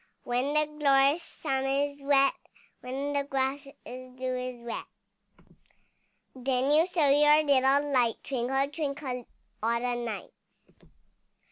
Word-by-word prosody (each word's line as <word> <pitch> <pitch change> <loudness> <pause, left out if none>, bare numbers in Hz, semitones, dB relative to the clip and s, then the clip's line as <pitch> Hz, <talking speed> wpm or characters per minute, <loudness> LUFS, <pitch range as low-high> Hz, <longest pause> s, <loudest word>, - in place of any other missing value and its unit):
When 255 +4 -1
the 305 0 +4
glorious 280 +2 +4
sun 270 -5 -3
is 285 +1 0
set, 275 -1 +3 0.5
When 270 +3 -4
the 285 0 +1
grass 275 0 -2 0.2
with 255 0 -10
dew 255 0 -2
is 250 -1 -5
wet, 235 - -5 1.5
Then 260 +1 0
you 315 +4 +4
show 335 -6 +2
your 295 +2 +5
little 280 0 +3
light, 240 -3 +3
Twinkle, 270 +1 0
twinkle 280 -5 -4 0.3
all 230 +2 +1
the 245 0 -1
night. 225 -3 -5
270 Hz, 125 wpm, -28 LUFS, 255-285 Hz, 1.5 s, your